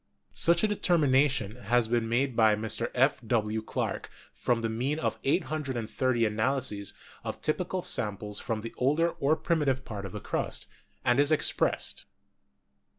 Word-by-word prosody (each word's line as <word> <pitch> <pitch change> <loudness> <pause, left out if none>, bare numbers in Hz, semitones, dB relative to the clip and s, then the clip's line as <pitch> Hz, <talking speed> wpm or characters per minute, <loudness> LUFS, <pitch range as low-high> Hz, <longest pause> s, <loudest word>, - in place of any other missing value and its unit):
Such 170 +2 +3
a - - +5
determination 140 - +2
has 120 0 +1
been 115 -1 0
made 125 +2 +1
by 110 -2 +5
Mr. 110 +2 -1
F. 130 +3 +3
W. 110 -1 0
Clarke 110 - -3 0.2
from 120 -1 0
the 115 - 0
mean 125 +7 -1
of 160 - -2
830 130 - 0
analyses 110 -1 -1 0.3
of - - -5
typical 180 +3 -1
samples 105 0 -2
from 110 -2 -3
the 115 - -7
older 150 +6 +3
or 145 +1 +1
primitive 145 -6 0
part 100 -3 -5
of - - -11
the - - -4
crust, - - -3 0.4
and 120 +2 +3
is 145 +1 +4
ex 155 - +4
pressed. - - -1
125 Hz, 155 wpm, -29 LUFS, 110-145 Hz, 0.4 s, a